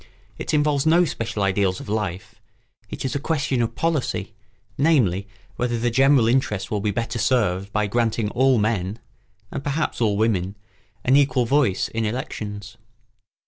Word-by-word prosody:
It -, -, -3 dB
involves 150 Hz, -1 st, +2 dB
no 170 Hz, +3 st, +5 dB
special 110 Hz, -8 st, -3 dB
ideals 95 Hz, -1 st, +1 dB
of -, -, -9 dB
life; 100 Hz, -4 st, -3 dB, 0.6 s
it -, -, -5 dB
is 130 Hz, -, -1 dB
a 140 Hz, -, -1 dB
question 145 Hz, -4 st, 0 dB
of 115 Hz, -, -2 dB
policy, 140 Hz, -, -1 dB, 0.4 s
namely, 120 Hz, -, +2 dB, 0.3 s
whether 120 Hz, -1 st, 0 dB
the 120 Hz, +1 st, 0 dB
general 135 Hz, -1 st, +4 dB
interest 115 Hz, -5 st, 0 dB
will 105 Hz, -, 0 dB
be 105 Hz, -, 0 dB
better 115 Hz, +3 st, -2 dB
served 100 Hz, -5 st, +1 dB
by 105 Hz, 0 st, +1 dB
granting 115 Hz, 0 st, 0 dB
all 130 Hz, 0 st, +3 dB
men 105 Hz, -2 st, 0 dB, 0.5 s
(and 140 Hz, -, -5 dB
perhaps 145 Hz, -2 st, -2 dB
all 105 Hz, -3 st, +2 dB
women) 100 Hz, -3 st, 0 dB, 0.5 s
an 130 Hz, -, +4 dB
equal 135 Hz, -3 st, +3 dB
voice 130 Hz, -6 st, +2 dB
in 115 Hz, 0 st, -3 dB
elections. 105 Hz, -3 st, -5 dB
115 Hz, 155 wpm, -23 LUFS, 105-135 Hz, 0.6 s, no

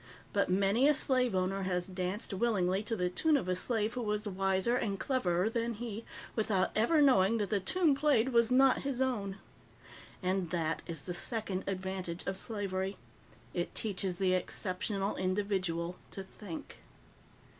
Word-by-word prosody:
But 200 Hz, -2 st, +2 dB
many 200 Hz, +8 st, +3 dB
a 300 Hz, -, +5 dB
slave 255 Hz, -6 st, +2 dB
owner 185 Hz, +1 st, 0 dB
has 180 Hz, -2 st, -1 dB
danced 185 Hz, +3 st, -3 dB
willingly 195 Hz, -3 st, +1 dB
to 220 Hz, +2 st, -2 dB
the 180 Hz, -3 st, 0 dB
tune 310 Hz, -, +3 dB
of 185 Hz, -, -3 dB
a 185 Hz, -, +1 dB
slave 220 Hz, +3 st, 0 dB
who 250 Hz, -, -3 dB
was 210 Hz, -1 st, -1 dB
wiser 195 Hz, +3 st, +1 dB
and 200 Hz, -6 st, -1 dB
cleverer 185 Hz, -8 st, +1 dB
than 230 Hz, 0 st, -1 dB
he, 225 Hz, 0 st, -6 dB, 0.3 s
without 210 Hz, -4 st, +1 dB
ever 295 Hz, +8 st, +4 dB
knowing 230 Hz, -5 st, +5 dB
that 205 Hz, -1 st, -2 dB
the 205 Hz, -, +2 dB
tune 320 Hz, -, +2 dB
played 275 Hz, -4 st, +3 dB
was 235 Hz, -2 st, +4 dB
not 265 Hz, +1 st, +5 dB
his 275 Hz, -3 st, -2 dB
own. 210 Hz, -7 st, -1 dB, 0.9 s
And 185 Hz, -1 st, 0 dB
that 165 Hz, -1 st, -1 dB
is 165 Hz, -5 st, -5 dB
the 180 Hz, -, -4 dB
second 195 Hz, 0 st, -2 dB
advantage 190 Hz, -2 st, -3 dB
of 195 Hz, -, -2 dB
slavery. 195 Hz, -2 st, -2 dB, 0.6 s
It 175 Hz, -1 st, -3 dB
teaches 195 Hz, -4 st, -1 dB
the 185 Hz, 0 st, +1 dB
exceptional 195 Hz, +2 st, -1 dB
individual 185 Hz, -3 st, -1 dB
to 195 Hz, -, -7 dB
think. 190 Hz, -3 st, -9 dB
195 Hz, 160 wpm, -32 LUFS, 185-230 Hz, 0.9 s, a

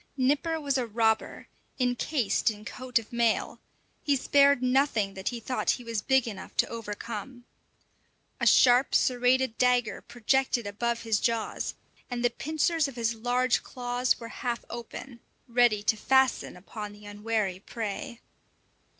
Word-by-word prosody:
Nipper 295 Hz, +5 st, +1 dB
was 280 Hz, -3 st, 0 dB
a 245 Hz, -, -2 dB
robber, 220 Hz, 0 st, 0 dB, 0.3 s
encased 250 Hz, -1 st, +1 dB
in 210 Hz, -1 st, -7 dB
coat 255 Hz, +1 st, -2 dB
of 230 Hz, 0 st, -4 dB
mail; 235 Hz, -2 st, +1 dB, 0.4 s
he 285 Hz, -, +2 dB
spared 280 Hz, 0 st, +4 dB
nothing 250 Hz, -6 st, +2 dB
that 190 Hz, 0 st, -3 dB
he 240 Hz, -, -5 dB
thought 255 Hz, +3 st, -2 dB
he 245 Hz, -, -11 dB
was 230 Hz, -3 st, -3 dB
big 265 Hz, 0 st, +2 dB
enough 200 Hz, -4 st, -8 dB
to -, -, +3 dB
overcome. 230 Hz, +2 st, -6 dB, 0.9 s
A -, -, +1 dB
sharp, 250 Hz, +1 st, +5 dB
serrated 250 Hz, -1 st, +2 dB
dagger 250 Hz, -3 st, +2 dB
projected 245 Hz, 0 st, 0 dB
above 230 Hz, +3 st, -2 dB
his 220 Hz, -3 st, +1 dB
jaws, 230 Hz, -2 st, -1 dB, 0.3 s
and 245 Hz, -1 st, -2 dB
the 240 Hz, -, +3 dB
pincers 315 Hz, +3 st, 0 dB
of 275 Hz, -, -9 dB
his 230 Hz, -1 st, 0 dB
large 245 Hz, +2 st, +1 dB
claws 245 Hz, 0 st, -1 dB
were 230 Hz, -, -8 dB
half 240 Hz, -2 st, -2 dB
open, 235 Hz, +1 st, -8 dB, 0.3 s
ready 235 Hz, -3 st, +3 dB
to 220 Hz, -, +2 dB
fasten 265 Hz, -3 st, +2 dB
upon 205 Hz, +3 st, -8 dB
the 205 Hz, 0 st, -15 dB
unwary 205 Hz, -2 st, -2 dB
prey. 230 Hz, +5 st, -6 dB
240 Hz, 145 wpm, -28 LUFS, 220-255 Hz, 0.9 s, sharp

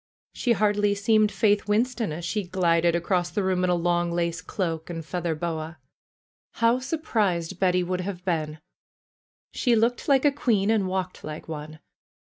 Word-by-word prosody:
She 240 Hz, -, +1 dB
hardly 205 Hz, -1 st, +2 dB
seemed 215 Hz, +1 st, +3 dB
Faith 205 Hz, -1 st, +2 dB
Winston 225 Hz, 0 st, 0 dB
as 165 Hz, +3 st, -5 dB
she 210 Hz, +4 st, -1 dB
glided 170 Hz, -2 st, +2 dB
across 175 Hz, +1 st, 0 dB
the 195 Hz, +3 st, -2 dB
room 185 Hz, -1 st, +1 dB
in 180 Hz, -, +2 dB
a 180 Hz, -, +3 dB
long 175 Hz, 0 st, +1 dB
lace 170 Hz, 0 st, -1 dB
cloak 165 Hz, -5 st, -3 dB
and 165 Hz, -2 st, -5 dB
feather 170 Hz, -1 st, -2 dB
boa. 160 Hz, 0 st, -4 dB, 0.8 s
How 230 Hz, +2 st, +2 dB
surprised 215 Hz, -, -1 dB
Betty 180 Hz, -1 st, +2 dB
would 180 Hz, +1 st, -2 dB
have 180 Hz, -1 st, -6 dB
been! 155 Hz, -4 st, -1 dB, 0.9 s
She 245 Hz, -3 st, +2 dB
looked 230 Hz, +2 st, +1 dB
like 275 Hz, 0 st, +4 dB
a 290 Hz, -, +6 dB
queen 220 Hz, -7 st, +1 dB
and 210 Hz, -4 st, +2 dB
walked 185 Hz, 0 st, -3 dB
like 155 Hz, 0 st, -7 dB
one. 155 Hz, 0 st, -7 dB
180 Hz, 165 wpm, -25 LUFS, 170-210 Hz, 0.9 s, a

